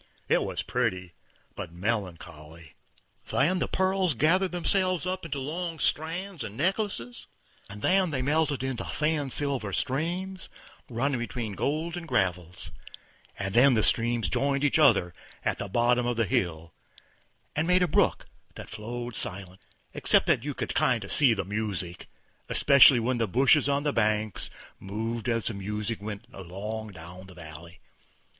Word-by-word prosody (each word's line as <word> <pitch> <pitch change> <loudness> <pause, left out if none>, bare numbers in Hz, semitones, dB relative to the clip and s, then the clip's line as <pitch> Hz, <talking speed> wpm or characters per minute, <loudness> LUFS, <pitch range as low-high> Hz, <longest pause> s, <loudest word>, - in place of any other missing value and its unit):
It - - +3
was - - -3
pretty, 95 -8 -2 0.4
but - - -6
melancholy. 85 -5 -5 0.6
Then 175 +7 +2
the - - 0
pearls 190 -4 +1
gathered 180 +8 +3
themselves 185 0 +1
into 180 -5 -3
long 165 +5 -4
strands 165 +5 -2
and 105 +2 -7
necklaces, 175 - -2 0.4
and 105 +1 -10
then 185 -1 +3
they 135 -4 -2
melted 145 -1 +1
into 130 -3 -3
thin 150 -2 -1
silver 135 -7 0
streams, 175 - -2 0.4
running 130 +2 -1
between 120 -2 -4
golden 165 - -2
gravels, 90 - -1 0.7
and 95 -1 -3
then 125 +3 +6
the 110 - +2
streams 115 -3 +2
joined 140 - 0
each 145 +2 +3
other 90 - +4 0.3
at - - 0
the 100 - -3
bottom 120 +3 +2
of 120 -1 -1
the 115 - +2
hill, 85 -3 -1 0.8
and 155 +3 0
made 180 0 +4
a - - +2
brook - - +2 0.3
that - - -9
flowed 120 +2 -6
silent, 95 0 -6 0.3
except - - +4
that 115 - +2
you 145 -1 -4
could - - -3
kinder 115 -6 +1
see 130 -6 +5
the 95 - -3
music, 100 -4 -4 0.4
especially 140 -2 +7
when 120 +1 0
the 115 - +1
bushes 135 +7 +4
on 140 0 +1
the 145 -1 0
banks 110 -2 0 0.3
moved 110 +4 -4
as 115 -2 0
the 115 - -1
music 105 +2 -3
went 105 -1 -6
along 100 +4 -6
down 90 0 -11
the 90 - -13
valley. 85 +1 -11
120 Hz, 150 wpm, -27 LUFS, 100-150 Hz, 0.8 s, especially